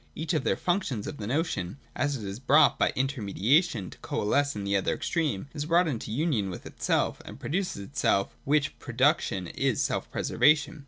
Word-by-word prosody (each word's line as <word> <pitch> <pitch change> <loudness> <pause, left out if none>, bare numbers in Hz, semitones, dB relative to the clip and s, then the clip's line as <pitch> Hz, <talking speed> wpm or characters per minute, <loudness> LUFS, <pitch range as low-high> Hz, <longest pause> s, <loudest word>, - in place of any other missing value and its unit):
Each 160 +3 -2
of 155 -5 +1
the - - +1
functions 175 - -1
of 145 - -6
the 105 - -5
notion, 130 - -1 0.2
as 145 0 0
it 110 - -8
is 100 +3 -6
brought 140 +4 +4
by - - +3
inter 135 -1 -1
mediation 105 - +1
to - - -14
coalesce 140 +6 0
with 100 -1 -4
the 100 0 +1
other 95 - +1
extreme, 150 - -1
is 145 -1 -3
brought 170 +2 +3
into 120 -7 -3
union 120 - 0
with 90 - -8
itself - - -1
and - - -10
produces 180 - -2
itself: 100 -5 0
which 145 0 +1
pro - - -8
duction 90 -3 +1
is - - +1
selfpreservation. 150 +1 +1
140 Hz, 190 wpm, -28 LUFS, 100-155 Hz, 0.2 s, brought